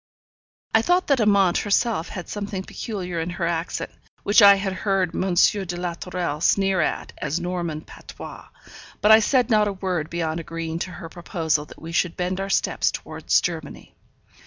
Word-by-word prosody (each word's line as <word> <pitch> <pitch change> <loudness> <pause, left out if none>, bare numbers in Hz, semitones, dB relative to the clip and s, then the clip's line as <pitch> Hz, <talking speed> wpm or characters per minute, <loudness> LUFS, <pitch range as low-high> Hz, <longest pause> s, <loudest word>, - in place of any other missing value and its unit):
I 220 - +5
thought 355 +8 +2
that 275 -3 +4
Amante 200 -4 +3
herself 205 -3 0
had 180 - -7
something 200 -2 -4
peculiar 185 -6 -5
in 165 +2 -2
her 170 0 -3
accent, 170 0 -2 0.3
which 205 +3 +5
I 200 -1 +9
had 195 -1 -2
heard 190 -2 0
M. 185 0 -1
de 180 -1 +2
la 175 -1 -2
Tourelle 170 -3 -4
sneer 195 0 +3
at - - -2
as 150 +3 -2
Norman 175 -3 -3
patois; - - -11 0.5
but 210 - +4
I 220 - +9
said 250 +2 +2
not 210 -1 +4
a 205 - -2
word 180 -5 -2
beyond 165 -1 -2
agreeing 165 0 -5
to 185 - -3
her 165 - -8
proposal 165 -3 -2
that - - -14
we 165 - -8
should 175 0 0
bend 185 +1 -2
our 195 0 -3
steps - - +1
towards - - 0
Germany. - - -5
180 Hz, 180 wpm, -23 LUFS, 170-200 Hz, 0.5 s, I